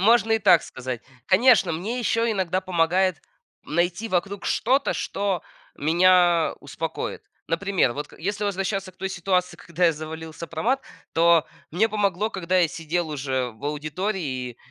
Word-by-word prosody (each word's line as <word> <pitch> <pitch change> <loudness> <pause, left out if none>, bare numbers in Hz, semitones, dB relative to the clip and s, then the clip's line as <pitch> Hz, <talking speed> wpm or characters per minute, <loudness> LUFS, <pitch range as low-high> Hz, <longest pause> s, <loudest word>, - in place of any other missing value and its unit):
Можно 225 +2 +4
и 225 - +4
так 175 -5 +5
сказать. 130 -2 -6 0.2
Конечно, 205 -3 +5
мне 210 +10 -3
ещё 230 0 +1
иногда 185 -3 0
помогает 180 -1 +1 0.4
найти 175 +7 -1
вокруг 195 +2 -2
что-то, 265 +4 +2
что 195 -3 -2 0.3
меня 175 +1 +4
успокоит. 155 +3 -5 0.2
Например, 180 -6 +1
вот 145 +2 -5
к - - -16
если 205 +4 -2
возвращаться 195 -1 -2
к 185 - -32
той 190 0 -4
ситуации, 180 0 0
когда 175 +1 -2
я 165 - +5
завалил 160 +1 -7
сопромат, 170 +12 -2 0.3
то 165 -1 +4 0.2
мне 210 +8 +2
помогло, 210 0 0
когда 185 0 0
я 170 -3 +4
сидел 165 +1 -2
уже 130 -3 -2
в 110 - -14
аудитории 155 +7 -2 0.3
и 120 - -15
180 Hz, 150 wpm, -24 LUFS, 160-200 Hz, 0.4 s, так